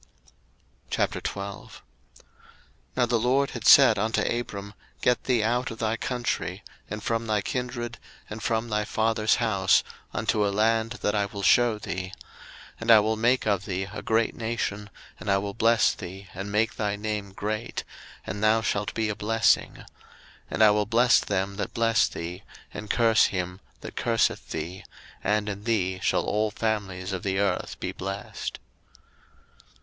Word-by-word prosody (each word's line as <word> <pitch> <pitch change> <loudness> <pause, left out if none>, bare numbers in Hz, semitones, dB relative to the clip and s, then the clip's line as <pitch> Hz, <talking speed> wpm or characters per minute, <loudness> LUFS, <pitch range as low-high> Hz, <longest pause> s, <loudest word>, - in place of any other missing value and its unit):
01:012:001 100 0 -3 1.2
Now 125 - +4
the 120 -1 +1
LORD 130 +4 +2
had 120 -2 -3
said 130 -7 +8
unto 110 +2 +1
Abram, 100 -4 -3 0.3
Get 125 - +2
thee 120 -4 +2
out 120 +3 0
of 115 - -7
thy 110 -1 0
country, 120 +1 -3 0.3
and 105 +1 -5
from 115 0 -1
thy 105 -2 +1
kindred, 125 0 -4 0.3
and 105 +1 -7
from 115 +1 0
thy 105 -1 0
father's 110 0 +1
house, 100 -5 +3 0.3
unto 105 - 0
a 100 - +2
land 110 +3 +1
that 105 - +1
I 100 -1 +1
will 100 0 -7
shew 120 +2 +4
thee: 95 -2 -5 0.7
01:012:002 - - -20
And 115 - -4
I 110 -2 +9
will 110 +1 +1
make 120 +4 +2
of 100 -2 +1
thee 95 -2 -2
a - - -5
great 115 0 +1
nation, 110 -3 -3 0.3
and - - -5
I 100 - +4
will 100 +1 -3
bless 115 +1 +3
thee, 95 +2 -9
and 95 +2 -5
make 110 +3 +1
thy 105 -1 0
name 105 -1 -4
great; 105 +3 -4 0.4
and 105 - -4
thou 110 +1 +4
shalt 105 -2 -1
be 110 -1 0
a 105 - -2
blessing: 115 +2 +2
01:012:003 - - -13 0.6
And - - +2
I 105 - +8
will 105 -1 +1
bless 120 +2 +5
them 100 0 -2
that - - -4
bless 115 0 +3
thee, 85 +3 -6 0.3
and 105 - -7
curse 115 -2 +4
him 90 -1 -3 0.2
that - - -8
curseth 115 -1 0
thee: 85 +4 -5 0.4
and 105 0 +1
in 105 +1 -5
thee 95 -5 0
shall - - +1
all 105 +1 0
families 100 -4 -2
of 95 - -3
the 95 -1 -1
earth 100 -2 -1
be - - -3
blessed. 95 +1 -5
105 Hz, 165 wpm, -26 LUFS, 100-115 Hz, 1.2 s, I